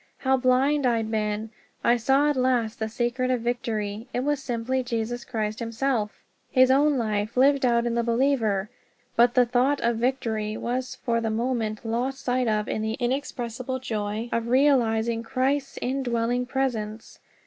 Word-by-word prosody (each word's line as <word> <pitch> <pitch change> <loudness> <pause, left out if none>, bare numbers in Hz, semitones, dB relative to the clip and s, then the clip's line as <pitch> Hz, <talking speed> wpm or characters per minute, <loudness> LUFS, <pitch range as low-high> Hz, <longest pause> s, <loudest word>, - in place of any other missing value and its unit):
How 265 0 +2
blind 260 +2 +2
I'd 225 -2 0
been! 215 0 -2 0.3
I 235 - +4
saw 270 +5 +3
at - - -2
last 250 -2 +1
the 220 0 -2
secret 240 +2 -1
of 250 -2 +1
victory 225 -2 -3
it 245 - +1
was 290 0 0
simply 255 0 -1
Jesus 240 0 -3
Christ 215 -1 -3
himself 230 -1 -2 0.3
his 255 0 +5
own 285 +1 +4
life 215 -1 -2
lived 270 0 +4
out 235 0 +2
in 240 - 0
the 235 - +1
believer. 230 -5 +1 0.4
But 240 +1 +4
the 250 -1 +6
thought 250 +4 +2
of 235 -1 +1
victory 225 -4 -1
was 255 +2 -3
for 230 -1 -1
the 225 - -1
moment 225 -1 -2
lost 245 +4 -2
sight 250 0 +1
of 215 -1 0
in 215 - -2
the 220 0 -1
inexpressible 255 0 -3
joy 220 -2 -3
of 230 0 -1
realizing 235 -4 +2
CHRIST'S 270 +3 -1
INDWELLING 245 -1 -1
PRESENCE! 230 -5 -3
240 Hz, 160 wpm, -25 LUFS, 225-260 Hz, 0.4 s, the